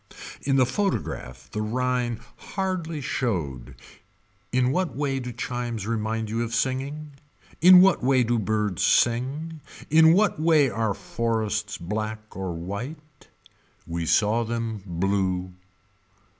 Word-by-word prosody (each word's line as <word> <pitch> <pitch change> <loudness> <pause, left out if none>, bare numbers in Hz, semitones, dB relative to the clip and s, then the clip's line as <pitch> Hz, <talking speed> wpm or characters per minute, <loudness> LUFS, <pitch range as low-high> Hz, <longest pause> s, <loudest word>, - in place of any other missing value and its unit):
In 135 -1 +1
the 130 -2 +5
photograph 120 - -3
the 105 - -3
Rhine 125 +1 -1
hardly 180 -5 -3
showed 80 - -3 0.8
In 125 0 +2
what 180 +4 -1
way 135 -2 -1
do 125 -1 -5
chimes 120 -2 -4
remind 110 0 -2
you 115 +2 -2
of 115 -1 -2
singing. 135 +5 -2 0.5
In 180 +1 +9
what 190 -7 +4
way 130 -1 +4
do 120 0 +1
birds 105 -2 -1
sing. 140 +7 +1 0.3
In 160 +1 +7
what 205 -3 +2
way 155 -5 +4
are 110 -3 -1
forests 110 -2 -2
black 110 +4 -5
or 95 -2 -3
white. 125 - -7 0.6
We 85 -1 -3
saw 110 +6 +3
them 115 -2 -3
blue. 95 0 -1
115 Hz, 125 wpm, -25 LUFS, 105-140 Hz, 0.8 s, In